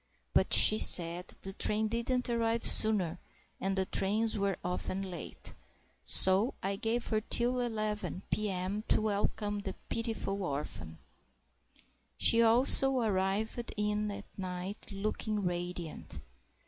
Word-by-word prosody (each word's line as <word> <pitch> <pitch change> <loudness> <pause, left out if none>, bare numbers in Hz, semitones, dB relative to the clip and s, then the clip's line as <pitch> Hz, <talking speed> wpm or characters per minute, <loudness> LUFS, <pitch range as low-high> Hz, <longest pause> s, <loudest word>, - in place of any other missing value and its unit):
But - - +1
she 215 - +9
said 170 +1 +4
the 195 - -6
train 215 +2 +1
didn't 235 +3 -2
arrive 230 -1 -1
sooner, 190 -6 +2 0.4
and 195 0 -2
the 190 - 0
trains 215 +5 -1
were 200 -2 -2
often 185 +2 -4
late. 175 - -8 0.5
So 190 +6 +5
I 195 +1 -2
gave 230 +4 -2
her 215 -1 0
till 240 +3 +1
11.0 215 -5 -4
p.m. 200 0 -3
to - - +2
welcome 205 0 -2
the 200 - -7
pitiful 225 -3 -4
orphan. 140 - -6 1.2
She 230 - +6
also 255 +3 +4
arrived 215 +2 -2
in 210 0 -2
at 200 - -8
night 185 +2 -6
looking 210 +1 -4
radiant. 175 -2 -5
210 Hz, 120 wpm, -30 LUFS, 190-225 Hz, 1.2 s, she